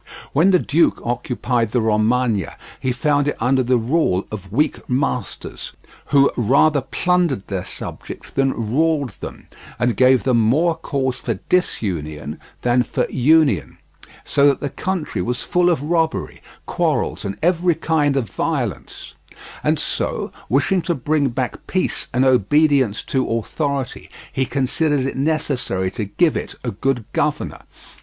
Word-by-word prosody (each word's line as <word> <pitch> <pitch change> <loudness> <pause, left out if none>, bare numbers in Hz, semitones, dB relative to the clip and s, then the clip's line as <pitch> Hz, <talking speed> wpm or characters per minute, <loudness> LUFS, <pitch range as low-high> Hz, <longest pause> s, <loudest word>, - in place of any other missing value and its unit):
When 160 +7 +4
the 185 - +6
duke 165 -1 +2
occupied 120 -1 -1
the 125 - +3
Romagna 110 -1 +1 0.2
he 130 - -1
found 145 +3 +1
it 145 - -1
under 130 +3 +2
the 125 0 +2
rule 115 - +1
of 100 -3 -7
weak 150 +8 0
masters, 125 -3 -3 0.3
who 140 -1 +4
rather 140 +5 +3
plundered 175 - 0
their 95 -3 -3
subjects 100 - -8
than 135 -5 0
ruled 155 -3 +2
them, - - -8 0.3
and 120 -1 +1
gave 130 -1 +4
them 125 -3 +3
more 150 +10 +3
cause 135 -5 -2
for - - -3
disunion 75 - -1 0.2
than 125 0 +3
for - - -1
union, 135 - +3 0.5
so 140 0 +3
that 140 - +3
the 145 - -3
country 185 -5 -3
was 125 +1 -2
full 175 0 +2
of 160 -5 0
robbery, 160 0 -1 0.2
quarrels, 90 +6 -1
and 100 -1 -4
every 175 0 +3
kind 150 -3 +1
of 125 -5 0
violence; - - -3 0.5
and - - +2
so, - - -2 0.2
wishing 160 +8 +2
to 170 +1 -1
bring 145 +1 +1
back 125 +1 -4
peace 185 - -1
and 125 +2 +2
obedience 130 -1 +3
to 130 -1 -1
authority, 135 +3 -3 0.2
he 130 -1 0
considered 140 +2 0
it 135 +1 -2
necessary 135 -10 -1
to 105 +1 -3
give 155 - +1
it - - -4
a 120 - -2
good 120 +2 -1
governor. - - -1
130 Hz, 145 wpm, -20 LUFS, 115-155 Hz, 0.5 s, the